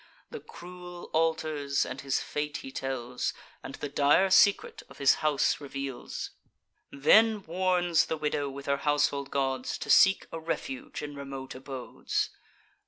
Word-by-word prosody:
The - - -6
cruel 175 0 -11
altars 155 -3 +1
and 135 - -6
his 135 -1 0
fate 150 0 -3
he 135 - -7
tells, 125 -2 -3 0.3
And 135 - -8
the - - -5
dire 145 +7 +3
secret 440 - +4
of - - -14
his 140 -1 +5
house 150 -1 +2
reveals, 140 -2 -5 0.6
Then 215 +9 +4
warns 175 -1 +2
the 160 - -2
widow, 150 -2 -1
with 140 +1 -8
her 140 0 +1
household 145 -1 +1
gods, 135 -2 -1
To - - -2
seek 190 0 +6
a 165 - -5
refuge 260 - -4
in 145 0 -6
remote 135 -1 -7
abodes. 130 -1 -3
145 Hz, 145 wpm, -29 LUFS, 140-175 Hz, 0.6 s, seek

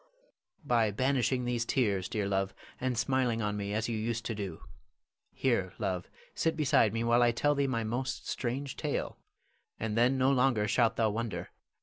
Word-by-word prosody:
_] - - -32
Louis. - - -36 0.3
By 115 -5 +3
banishing 130 +2 +1
these 120 -1 0
tears, 100 -7 0
dear 105 -2 -1
love, 95 0 -1 0.2
and 130 -2 -1
smiling 120 -1 +1
on 105 0 -1
me 100 0 -3
as 110 +2 -1
you 115 - -2
used 115 +1 -2
to 115 - -2
do. 100 -6 -6 0.7
Here, 110 -9 0
love, 90 -2 -2 0.2
sit 160 -1 0
beside 140 -8 +4
me 115 +2 -1
while 120 +1 +4
I 120 - +5
tell 145 +5 +2
thee 140 -1 +1
my 115 -3 -1
most 120 +4 -3
strange 130 +2 -3
tale, - - -3 0.6
and 110 -1 -2
then 120 +3 +3
no 130 +1 +3
longer 125 -5 +2
shalt 115 +2 +3
thou 110 -2 +2
wonder. 115 0 -4
115 Hz, 190 wpm, -31 LUFS, 105-130 Hz, 0.7 s, I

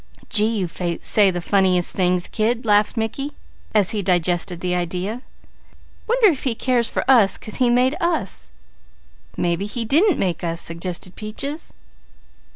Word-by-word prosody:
"Gee! 220 +1 +3
You 190 -3 -1
say 180 +4 +1
the 175 -1 -3
funniest 185 -2 +2
things, 180 -1 +1
kid," 230 +2 -1
laughed 210 +2 +2
Mickey 275 +6 -3 0.4
as 205 -4 +2
he 210 - -1
digested 175 -1 0
the 180 0 -1
idea. 180 +6 -3 0.9
"Wonder 475 0 +3
if 300 -7 -2
He 250 -4 0
cares 245 -1 +1
for - - -2
us 235 -7 +5
'cause 215 - -6
He 250 -2 +3
made 250 +4 +3
us." 260 - -1 0.9
"Mebby 175 +3 -1
he 230 +2 -3
didn't 335 - +3
make 180 -4 -2
us," 165 -1 -2
suggested 175 +2 -5
Peaches. 275 +9 -5
205 Hz, 150 wpm, -21 LUFS, 180-245 Hz, 0.9 s, us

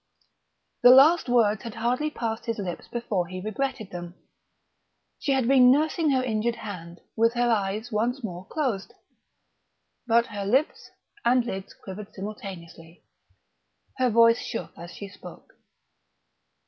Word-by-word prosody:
The 245 - +8
last 275 +4 +7
words 220 -4 +3
had 230 - -8
hardly 245 +6 0
passed 230 -5 -4
his 230 0 -1
lips 185 -4 -5
before 210 -7 -2
he 185 +1 -6
regretted 215 +1 -3
them. 175 0 -7 1.0
She 280 - -1
had 265 -3 +2
been 255 -2 +6
nursing 310 +4 +2
her 260 -2 +2
injured 230 -1 -1
hand, 175 -6 -9
with 230 +1 +2
her 240 0 +2
eyes 215 +2 -1
once 235 +5 -1
more 185 -3 -6
closed; 250 -11 -3 1.1
but 235 0 +4
her 205 -3 -6
lips 265 +8 0 0.3
and 245 0 +3
lids 195 -5 -6
quivered 200 +1 -10
simultaneously. 185 -5 -9 0.9
Her 255 -1 +2
voice 230 +1 +5
shook - - -6
as 170 - -10
she 200 - -8
spoke. 200 - -13
230 Hz, 135 wpm, -26 LUFS, 195-250 Hz, 1.1 s, The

